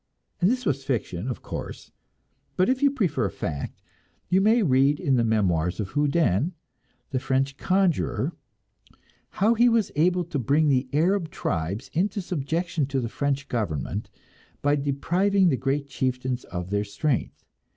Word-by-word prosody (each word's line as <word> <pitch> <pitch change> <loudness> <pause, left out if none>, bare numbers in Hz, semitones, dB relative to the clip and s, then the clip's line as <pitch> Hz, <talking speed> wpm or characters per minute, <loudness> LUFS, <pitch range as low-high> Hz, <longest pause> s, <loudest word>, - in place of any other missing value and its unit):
And 180 - +5
this 250 +1 -1
was 135 0 0
fiction, 115 -6 -2
of 125 - -4
course; - - -7 0.6
but 185 - +3
if 260 +1 +1
you 285 - +5
prefer 240 - 0
fact, 70 -1 -5 0.5
you 185 +1 +4
may 220 +3 +4
read 140 -1 +3
in 135 - +2
the 120 - +3
memoirs 90 -6 +1
of 100 -3 -2
Houdin, 145 - +1 0.6
the 130 - 0
French 135 +1 0
conjurer, 180 - +1 1.0
how 215 +5 +2
he 240 +1 +5
was 230 -4 +2
able 180 +4 +3
to 160 -4 -3
bring 145 +6 +2
the 130 -1 +1
Arab 170 +3 +2
tribes 85 - -3
into 195 +5 0
subjection 170 -3 -2
to 135 -1 -1
the 115 -2 -3
French 140 +2 -1
government 100 - -3 0.5
by 145 +1 +3
depriving 175 +8 +2
the 140 - +2
great 135 +3 -1
chieftains 130 -2 -2
of 90 +1 -6
their 100 0 +1
strength. 110 +7 -2
140 Hz, 150 wpm, -25 LUFS, 125-180 Hz, 1.0 s, And